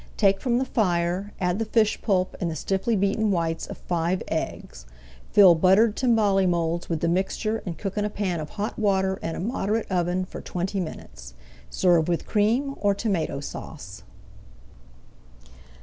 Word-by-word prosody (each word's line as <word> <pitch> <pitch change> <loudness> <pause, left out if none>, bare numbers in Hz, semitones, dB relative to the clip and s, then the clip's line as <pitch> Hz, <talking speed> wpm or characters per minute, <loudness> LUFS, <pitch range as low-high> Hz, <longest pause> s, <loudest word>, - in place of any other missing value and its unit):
Take 195 -2 +3
from 240 -2 +1
the 260 - 0
fire, 185 -3 0
add 180 +2 0
the 225 - 0
fish 215 -1 +1
pulp 185 -4 0
and 175 - 0
the 160 - -4
stiffly 195 +8 -1
beaten 200 +2 +1
whites 165 -3 -1
of - - -8
five 175 +1 -1
eggs. - - -5 0.4
Fill 195 -4 +7
buttered 190 +6 +4
timbale 210 -6 +2
moulds 170 0 -1
with 165 -3 -2
the 170 - +1
mixture 195 +5 -1
and 170 - -4
cook 200 0 -3
in - - 0
a 210 - -1
pan 195 -5 -2
of 150 -1 -6
hot 210 +3 -3
water 190 -2 +1
in 165 - -3
a - - -5
moderate 215 +1 -1
oven 180 0 0
for - - -9
twenty 185 +3 -3
minutes. - - -8 0.3
Serve 175 -4 +3
with 170 -1 -1
Cream 235 +7 +1
or 200 -1 +2
Tomato 195 -9 -1
Sauce. 110 -8 -8
190 Hz, 165 wpm, -25 LUFS, 170-210 Hz, 0.4 s, Fill